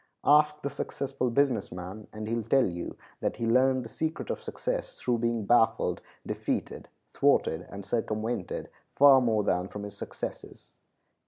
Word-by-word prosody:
Ask 150 +1 +4
the 140 - -2
successful 135 -2 -2
business 125 -4 +1
man, 90 +4 -7
and 110 0 -6
he 115 - -2
will 115 - 0
tell 125 +4 +3
you 85 -1 -5 0.2
that - - -1
he 115 - -3
learned 130 +2 +3
the - - -8
secret 160 +7 -3
of - - -4
success - - -4
through 120 -1 0
being 115 -2 0
baffled, 115 0 +3 0.2
defeated, - - -3 0.2
thwarted, 80 +2 +2
and 100 -1 -8
circumvented, 110 -1 -2 0.2
far 140 -2 +8
more 110 -4 +2
than 90 -1 0
from 105 +1 -7
his 100 0 -7
successes. - - -7
115 Hz, 160 wpm, -29 LUFS, 105-135 Hz, 0.2 s, far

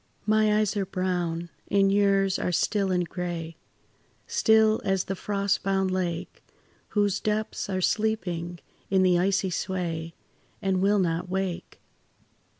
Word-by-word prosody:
My 215 0 +3
eyes 215 -1 +1
are 200 -2 0
brown, 175 -2 -2 0.2
and 195 -1 +3
yours 195 -1 +3
are - - -1
still 195 +3 +1
and 180 -1 +1
grey, 170 -2 -5 0.7
Still 220 0 +3
as 195 -1 +1
the 195 - -3
frostbound 195 -1 0
lake 175 -3 -3 0.5
Whose 205 -2 +2
depths 215 -1 -2
are 185 -1 -1
sleeping 180 -5 -1 0.3
in 190 -1 +3
the 180 -1 +4
icy 190 0 +1
sway, 170 -3 -3 0.4
And 190 -1 0
will 205 +2 +3
not 175 -1 0
wake. 190 -2 -3
190 Hz, 130 wpm, -26 LUFS, 180-200 Hz, 0.7 s, the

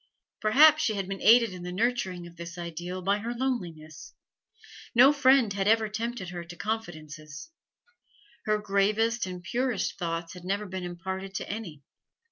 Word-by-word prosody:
Perhaps 300 +8 +6
she 215 - +1
had 195 -2 -3
been 195 0 -5
aided 230 -2 +6
in 180 - -8
the 180 0 -5
nurturing 190 -4 -1
of 170 0 -12
this 170 +1 -8
ideal 175 +2 -6
by 200 +2 +1
her 235 +3 -4
loneliness; 175 - -4 0.8
no 260 +5 +8
friend 265 -6 +4
had 195 0 -1
ever 220 0 +4
tempted 225 -3 -4
her 175 -1 -6
to 170 +1 -11
confidences; 155 - -6 0.9
her 215 0 +2
gravest 210 +2 +1
and 180 -1 -7
purest 240 -1 -1
thoughts 165 -1 -3
had 180 -1 -11
never 200 +3 -2
been 190 -1 -5
imparted 190 +2 -6
to - - -4
any. 180 -9 -6
195 Hz, 160 wpm, -28 LUFS, 175-225 Hz, 0.9 s, no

